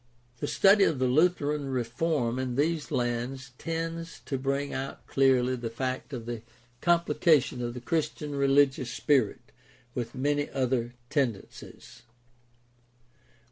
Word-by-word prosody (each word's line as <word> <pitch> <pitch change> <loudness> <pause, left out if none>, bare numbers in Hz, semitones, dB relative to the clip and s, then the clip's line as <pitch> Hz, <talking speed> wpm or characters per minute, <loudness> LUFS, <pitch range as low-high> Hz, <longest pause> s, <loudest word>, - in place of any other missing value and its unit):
The 145 - -2
study 200 +5 +5
of 155 - +1
the 130 - +1
Lutheran 150 0 +2
reform 125 0 -1
in 130 -2 -2
these 155 +2 0
lands 125 +2 -2
tends 165 0 -4
to 135 - -3
bring 140 +1 -1
out 135 +1 -5
clearly 130 -2 +3
the 120 -2 -4
fact 130 +4 -3
of 120 -4 -5
the 120 -2 -5 0.4
complication 165 -6 +3
of 120 0 -3
the 125 - -6
Christian 150 0 -2
religious 140 -2 +3
spirit 130 -3 +1 0.4
with 120 -1 -4
many 145 +2 0
other 125 -2 -1 0.2
tendencies. 125 -9 -3
135 Hz, 125 wpm, -28 LUFS, 125-150 Hz, 0.4 s, study